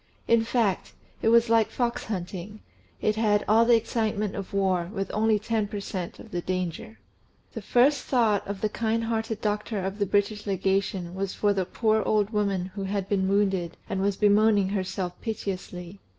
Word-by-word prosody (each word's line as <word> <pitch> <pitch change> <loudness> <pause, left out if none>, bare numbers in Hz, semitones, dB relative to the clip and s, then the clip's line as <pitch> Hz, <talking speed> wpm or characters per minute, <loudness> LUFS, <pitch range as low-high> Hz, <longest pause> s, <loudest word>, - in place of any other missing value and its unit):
In 230 -1 +4
fact, 225 -4 0 0.3
it - - 0
was 230 +1 +5
like 225 -1 +3
fox 240 -2 -2
hunting: 195 0 -5 0.4
it 215 0 +1
had 210 -2 +2
"all 225 +2 +5
the 240 0 +6
excitement 220 -2 -1
of 200 -2 -6
war, 185 -3 +1
with 195 -3 -3
only 220 0 +3
ten 215 0 -1
per 205 0 -5
cent. 185 -3 -5
of - - -13
the 175 - -2
danger." 180 -11 -4 0.6
The 225 - -5
first 250 +6 +3
thought 225 -6 +2
of 200 -1 -5
the 215 - +2
kind 225 +1 -1
hearted 225 -1 -2
doctor 210 0 -1
of 195 +2 -4
the 205 - +1
British 205 +1 0
Legation 190 -2 -1
was 195 0 -3
for 205 -1 +2
the 190 -2 -1
poor 220 +3 +1
old 210 -1 +1
woman 200 -4 -1
who 195 -1 -4
had 195 -1 -2
been 190 -2 +1
wounded, 195 -4 +1
and 190 - -2
was 200 0 +1
bemoaning 205 -1 +4
herself 185 -2 -2
piteously. 190 -4 -5
205 Hz, 180 wpm, -26 LUFS, 190-220 Hz, 0.6 s, the